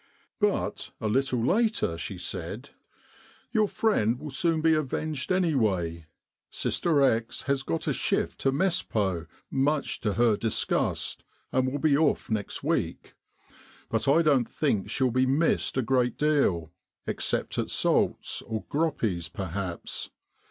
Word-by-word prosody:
But - - 0
a 110 - -2
little 125 +1 +1
later 215 - +2
she 85 - -5
said, - - -5 0.4
* - - -28
Your 215 -1 +3
friend 125 - +1
will 150 - -6
be - - -9
soon 165 +2 +1
avenged 155 0 -2
anyway. 105 - +1 0.4
Sister 155 -5 +1
X 115 -3 +1
has 140 0 0
got 80 -11 -3
a - - +2
shift 85 +1 -1
to 135 - +2
Mespot 110 - 0 0.2
much 140 +2 0
to 105 -3 -1
her 115 -1 +3
disgust, 115 0 0 0.3
and 130 0 +1
will 145 - -2
be 145 0 +3
off 150 -5 +1
next 105 -2 -2
week. - - -2 0.8
But - - 0
I 160 +5 +5
don't 140 -6 +3
think 110 -10 0
she'll 130 +2 +1
be 130 +2 +2
missed 145 +1 +1
a 130 - +2
great 125 -1 +1
deal, 120 - +1 0.3
except - - -1
at - - -1
Sault's - - +1
or 110 -1 -4
Groppi's 115 - -1
perhaps. 95 0 -4
130 Hz, 140 wpm, -27 LUFS, 105-150 Hz, 0.8 s, I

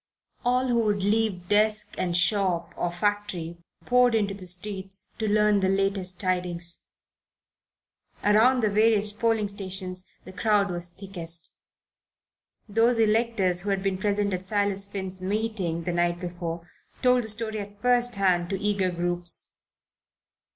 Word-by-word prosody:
All 250 +1 +2
who 235 -1 +3
could 200 -2 -2
leave 205 -4 0
desk 210 +1 +1
and 175 -1 0
shop 180 -1 +1
or 175 - -1
factory 175 -2 -2 0.3
poured 250 -1 +4
into 205 -3 +1
the 190 -2 -10
streets 190 +1 -4
to 220 - 0
learn 210 0 +4
the 190 -1 +1
latest, 195 -1 0
tidings. 180 -3 -1 1.4
Around 225 +4 +4
the 215 - +3
various 215 0 +4
polling 220 0 +1
stations 190 -2 -2 0.2
the 185 - -10
crowd 205 -1 +2
was 175 0 -3
thickest. 170 -3 -7 1.1
Those 225 +3 +3
electors 215 -5 +2
who 205 - -4
had 195 -1 0
been 195 -1 -1
present 205 -1 0
at 185 +1 -4
Silas 200 -1 +1
Finn's 190 -2 -4
meeting, 195 -4 -2
the 175 - -2
night 175 0 +1
before, 175 -1 -5 0.4
told 250 -1 +4
the - - -7
story 220 0 -3
at 205 0 -8
first 245 0 +2
hand 180 -3 +2
to 195 -1 -2
eager 200 -2 +1
groups. 175 0 -2
195 Hz, 145 wpm, -26 LUFS, 180-215 Hz, 1.4 s, poured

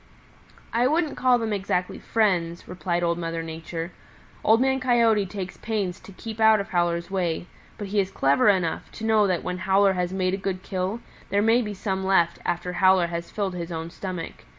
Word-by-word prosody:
"I 240 +2 +3
wouldn't 310 +1 +1
call 255 -1 +4
them 225 -2 -2
exactly 185 -2 -1
friends," 180 -6 0
replied 175 -1 -2
Old 170 0 +1
Mother 165 -1 -3
Nature. 165 +1 -6 0.5
"Old 220 +1 +5
Man 265 +1 +2
Coyote 230 -5 +3
takes 190 -1 -6
pains 205 -5 -2
to - - -13
keep 220 +3 -8
out 220 -1 +6
of 200 - -4
Howler's 175 0 0
way, 175 -3 -1 0.3
but 205 -2 -6
he 205 +1 +1
is 190 -1 +1
clever 140 +4 +3
enough 185 -5 0
to 220 - -6
know 215 -2 +4
that 180 -3 0
when 180 0 -3
Howler 195 +1 +3
has 180 -1 -1
made 185 -1 0
a - - 0
good 190 -1 -3
kill 190 +4 -3 0.3
there 200 +2 +2
may 225 +3 +4
be 210 -3 -4
some 190 -1 -2
left 175 -3 +2
after 175 +1 -2
Howler 185 -1 +4
has 170 0 -4
filled 200 -3 -2
his 175 -1 -5
own 165 0 -5
stomach. 180 - -6
190 Hz, 195 wpm, -25 LUFS, 175-210 Hz, 0.5 s, out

